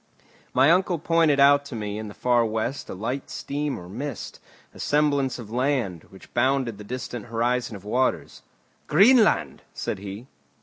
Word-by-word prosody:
My 140 - +5
uncle 180 0 +2
pointed 165 -2 +2
out 140 +1 +6
to 140 - -7
me 105 -1 -4
in 110 - -6
the 105 - -10
far 120 -1 +2
west 110 +4 -3
a - - -5
light 120 +8 -4
steam 145 0 -3
or 90 - -10
mist, 140 +10 -6 0.3
a - - -14
semblance 145 -3 +1
of 110 -4 -10
land, 125 - -1
which 95 - -17
bounded 125 -3 +1
the - - -8
distant 120 0 -6
horizon 120 0 -1
of 100 0 -11
waters. 125 +5 -1 0.5
"Greenland!" 215 - +4
said - - -3
he. 100 +4 -8
125 Hz, 165 wpm, -25 LUFS, 110-145 Hz, 0.5 s, out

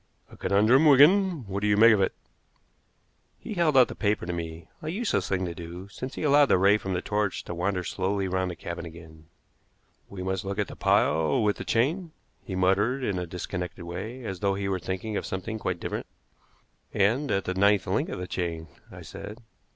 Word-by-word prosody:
"A - - -12
conundrum, 110 +10 +4
Wigan. 155 - +5
What 100 0 -3
do 105 - +1
you 105 0 +3
make 115 +1 +8
of 100 - +2
it?" - - 0 1.2
He - - -6
held 165 -7 +2
out 125 - +7
the - - -7
paper 100 +2 -1
to 90 - -3
me, 80 -1 -6
a 155 - -4
useless 210 +7 -1
thing 95 -1 0
to 85 - -4
do, 85 +3 -9
since 130 +6 -7
he - - -5
allowed 145 -1 +5
the - - +4
ray 100 +3 +4
from 95 -2 -4
the 90 - -2
torch 105 -2 -1
to - - -6
wander 90 +1 -1
slowly 95 +2 -1
round 95 0 -1
the 90 - -5
cabin 85 0 -6
again. 80 -2 -12 0.8
"We 95 -2 -7
must 95 +1 -2
look 100 0 -4
at 105 -3 -1
the - - -8
pile 80 - +2
with 105 -1 +1
the - - -5
chain," 155 +9 0 0.3
he 95 - -5
muttered 100 +8 +2
in 100 -6 -1
a 90 - -4
disconnected 90 0 -5
way, 105 +9 -6
as 95 -4 -5
though 100 0 +1
he 100 0 -3
were 95 -1 -1
thinking 95 +4 -4
of - - -3
something 100 +4 -4
quite 90 -4 -2
different. - - -4 0.8
"And 120 +9 +1
at 100 -1 0
the 90 - -1
ninth 100 +1 +3
link - - -1
of - - -4
the 90 - -4
chain," 85 -3 -4 0.2
I - - -10
said. 105 - -9
100 Hz, 215 wpm, -27 LUFS, 90-115 Hz, 1.2 s, make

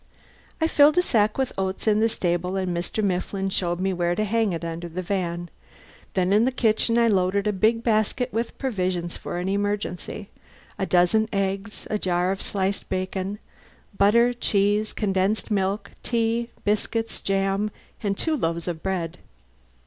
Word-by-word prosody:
I 320 - +2
filled 300 0 +5
a 360 - +5
sack 215 -8 +2
with 265 -1 0
oats 190 0 -2
in 215 -1 +4
the 225 +1 +3
stable 180 -2 -1
and 185 -2 -1
Mr. 180 +5 -2
Mifflin 195 0 -1
showed 175 -2 0
me 190 0 0
where 175 -1 0
to 215 - 0
hang 220 0 +1
it 170 -1 -3
under 165 +1 -5
the 180 +3 -4
van. 175 -2 -2 0.7
Then 185 0 +2
in 210 +2 +5
the 260 - +2
kitchen 230 -1 +2
I 235 0 +5
loaded 195 -1 +2
a 210 - +1
big 220 +4 +2
basket 230 +3 +1
with 230 +1 -2
provisions 185 -9 -2
for - - -5
an 180 +1 -2
emergency: 200 -1 -2 0.5
a 190 - 0
dozen 185 +5 +3
eggs, 195 +1 -2
a 210 - 0
jar 180 0 +1
of 195 - -3
sliced 195 0 -2
bacon, 185 +2 -2 0.6
butter, 235 +5 +4
cheese, 210 -2 +1
condensed 200 +2 0
milk, 200 0 0
tea, 230 0 0
biscuits, 225 +2 -1
jam, 195 +1 0 0.3
and 200 -2 -1
two 320 -1 +1
loaves 170 - -2
of 165 -2 -3
bread. 180 -4 -3
195 Hz, 165 wpm, -25 LUFS, 185-220 Hz, 0.7 s, filled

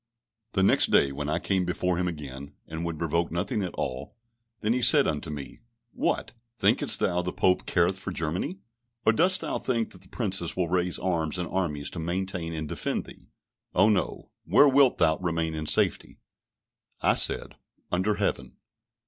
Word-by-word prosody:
The 95 - +2
next - - +5
day, 70 - +3
when 75 +2 -5
I 80 - 0
came 95 +1 0
before 90 0 -1
him 90 - 0
again, 70 -4 -7
and 80 +1 -6
would 85 -2 -4
revoke 85 +1 -1
nothing 95 +5 -2
at 90 -3 -5
all, 65 - -5 0.4
then 110 +2 +1
he 125 - -1
said 145 +3 +7
unto 75 +1 -3
me, 70 -4 -8 0.3
"What? - - -2 0.2
thinkest - - +3
thou 90 - 0
that 90 - -1
the 90 - -2
Pope 90 0 +1
careth 90 +2 +1
for 95 - -5
Germany? 90 +3 -3 0.4
or 110 - +5
dost 185 +9 +4
thou - - -3
think 115 -3 -2
that 90 - -12
the 90 - -15
Princes 95 -8 -1
will 90 -3 0
raise 90 0 0
arms 85 -3 -2
and 90 -1 -3
armies 75 -6 -3
to 90 - -6
maintain 90 0 -3
and 80 -1 -5
defend - - -3
thee? - - -15 0.5
Oh, 95 +4 +5
no; 105 -4 -2
where 145 - +5
wilt 135 -1 +4
thou 80 -2 +2
remain 85 -2 -2
in 75 -1 -5
safety?" - - +1 0.9
I - - +5
said, - - +4 0.4
Under 95 +4 +1
Heaven. - - -3
90 Hz, 180 wpm, -26 LUFS, 80-95 Hz, 0.9 s, said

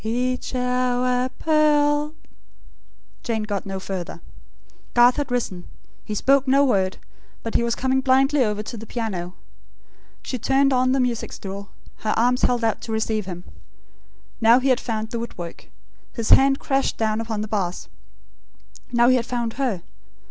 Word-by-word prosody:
Each 250 +3 -2
hour 250 0 +1
a - - -3
pearl 300 0 +2 0.5
" - - -32
Jane 225 -3 -1
got 205 -2 -3
no 195 0 -4
further. 185 -3 -5 0.8
Garth 245 +1 +6
had 290 -2 -2
risen. 225 -8 -2 0.4
He 210 - -5
spoke 275 +5 +3
no 275 +2 +4
word; 190 -7 +1 0.5
but 225 - -4
he - - +3
was 235 0 0
coming 265 0 +1
blindly 270 +1 +3
over 210 -2 -1
to 230 - -7
the 220 +1 -9
piano. 190 -7 -4 0.9
She 255 - -4
turned 270 +3 +3
on 255 0 +2
the 270 - +2
music 245 -3 -1
stool, 200 +1 -7 0.3
her 215 - -1
arms 245 +2 +2
held 245 -1 +2
out 225 -1 0
to 225 - -6
receive 220 -2 -1
him. 175 -1 -6 1.0
Now 230 +2 +6
he 265 +1 0
had 255 -1 +3
found 220 -2 -4
the 235 - -2
woodwork. 175 -7 -8 0.4
His 230 -3 -2
hand 270 0 +6
crashed 270 0 0
down 220 0 0
upon 220 -2 -3
the 215 - -3
bass. 195 -4 -2 1.0
Now 240 0 +4
he 255 0 +5
had 235 - -2
found 235 -2 -2
her. 245 -10 -2
240 Hz, 165 wpm, -23 LUFS, 215-260 Hz, 1.0 s, Garth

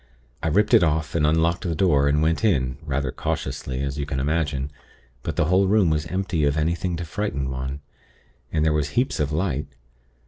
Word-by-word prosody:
I 85 - -1
ripped 105 +9 +2
it 115 - +8
off, 80 -1 +1
and 75 -3 +2
unlocked 80 +2 +2
the 85 -3 -2
door, 75 -5 +3
and 75 +2 +2
went 80 +6 +1
in, 65 - +1
rather 70 -4 -2
cautiously, 65 +1 -3
as 70 +1 -3
you 70 - -2
can 65 - -2
imagine; 75 -1 -1 0.5
but - - -4
the - - +2
whole 95 +4 +3
room 100 -4 +4
was 75 +1 0
empty 90 -3 -1
of 70 +1 +2
anything 85 +3 0
to 85 +1 -4
frighten 80 -7 -3
one, 65 +2 -4 0.7
and 80 -1 +1
there 80 - +3
was 75 -1 0
heaps 130 +2 +1
of 75 -1 0
light. 75 -3 -1
80 Hz, 200 wpm, -24 LUFS, 70-85 Hz, 0.7 s, it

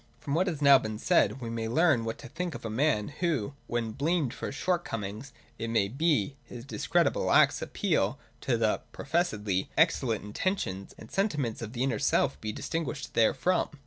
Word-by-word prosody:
From 140 - -4
what 180 +5 +2
has 155 -5 -2
now 140 -1 +8
been 110 0 -4
said, 105 +3 +2
we 115 -1 -4
may 115 -1 -2
learn 125 -1 +3
what 115 - -3
to 140 - -10
think 170 +6 -4
of - - -8
a 110 - -3
man! 120 -3 +1
who, 150 - 0
when 115 -2 -2
blamed 150 +2 0
for - - -5
his - - -6
shortcomings, 125 - -2 0.3
it 115 0 -3
may 110 -4 +2
be, 140 -1 +1
his 120 0 -10
discreditable - - +1
acts, - - +5
appeals 100 +6 0 0.3
to 120 -3 +1
the 110 -2 +1
(professedly) 105 - -1
excellent 135 - +2
intentions 105 - -3
and 110 - -12
sentiments 150 - -1
of 115 0 -6
the 125 0 -1
inner 125 -5 0
self - - +2
he 110 - -3
dis - - -6
tinguishes 160 -3 -3
therefrom. 135 +10 +2
125 Hz, 185 wpm, -29 LUFS, 110-155 Hz, 0.3 s, now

